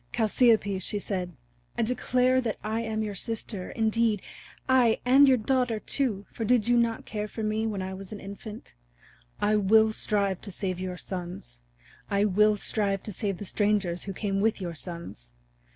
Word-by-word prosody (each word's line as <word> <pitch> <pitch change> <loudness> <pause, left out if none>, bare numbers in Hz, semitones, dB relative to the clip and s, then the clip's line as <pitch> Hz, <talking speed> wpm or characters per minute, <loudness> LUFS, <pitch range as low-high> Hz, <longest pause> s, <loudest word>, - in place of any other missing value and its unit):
"Chalciope," 220 -3 +3
she 205 - -2
said, 185 -3 -3 0.4
"I 235 - +2
declare 255 +2 +2
that 230 -4 -2
I 220 +2 -1
am 220 -1 -2
your 210 -1 -3
sister, 205 -1 -4
indeed 220 -2 +1 0.4
aye, 250 -3 +4
and 270 +3 +7
your 260 -1 +5
daughter, 245 -1 0
too, 215 -6 -1
for 225 - -5
did 230 0 +2
you 240 - +4
not 235 -1 +1
care 210 -1 -4
for 220 +1 -6
me 215 +1 0
when 200 -3 -3
I 190 0 -5
was 190 0 -9
an 210 - -6
infant? 210 +2 -9 0.7
I 210 +1 +2
will 220 +2 +5
strive 200 -3 0
to 200 - -7
save 185 -1 -3
your 185 -1 -4
sons. 175 - -7 0.5
I 200 +1 +2
will 210 +1 +4
strive 200 -2 0
to 210 - -6
save 195 0 -2
the 205 - -7
strangers 200 -4 0
who 195 - -4
came 195 0 -1
with 220 0 +1
your 175 -3 -4
sons. 165 - -8
210 Hz, 180 wpm, -27 LUFS, 195-225 Hz, 0.7 s, and